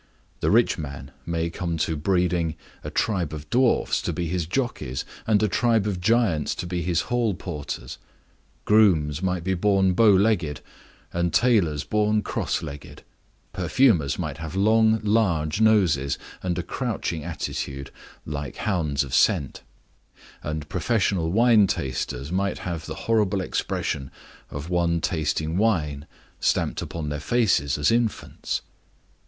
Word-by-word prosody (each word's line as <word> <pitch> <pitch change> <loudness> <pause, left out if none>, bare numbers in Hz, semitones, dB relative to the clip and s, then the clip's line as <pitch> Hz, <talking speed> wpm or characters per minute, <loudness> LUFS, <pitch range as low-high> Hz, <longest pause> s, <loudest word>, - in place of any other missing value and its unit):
The - - +1
rich 115 -4 +3
man 70 -2 -7 0.2
may 85 0 -1
come 85 -1 -3
to 80 +1 0
breeding 85 0 0 0.3
a - - -5
tribe 90 -8 -1
of 75 0 -7
dwarfs 125 0 +2
to - - -2
be 85 +1 -3
his 85 -1 -2
jockeys, 90 - -2 0.2
and 110 -1 +3
a - - +4
tribe 115 +1 +2
of 95 -4 -2
giants 100 -7 +2
to - - -5
be 90 0 -2
his 85 -1 +1
hall 120 -5 0
porters. 75 -8 -6 0.7
Grooms 85 -9 +4
might 90 -2 -1
be 95 +2 0
born 95 0 +2
bow 110 +4 +5
legged 95 - +2 0.5
and 85 0 0
tailors 90 - +2
born 105 0 +1
cross - - -2
legged; 70 0 -9 0.5
perfumers 90 - +2
might 75 -4 -4
have 80 +2 -6
long, 110 +2 +4
large 100 -6 +1
noses 85 -11 +3 0.2
and 90 -1 -2
a 90 - -2
crouching 105 - -3
attitude, 70 -4 -5 0.3
like 70 -3 -5
hounds 80 -9 0
of 65 - -8
scent; 70 - +2 0.8
and 75 0 -4
professional 95 -8 0
wine 110 -1 +5
tasters 70 -2 -3
might 100 +2 0
have 85 -3 -5
the 80 - -5
horrible 105 -4 +2
expression 70 -6 -2 0.4
of 70 +2 -6
one 85 -1 +1
tasting 80 -1 -1
wine 80 -10 0 0.3
stamped - - 0
upon 80 -3 -5
their 75 0 -3
faces 80 - +1
as 75 - +2
infants. 115 -2 -1
90 Hz, 140 wpm, -24 LUFS, 75-105 Hz, 0.8 s, bow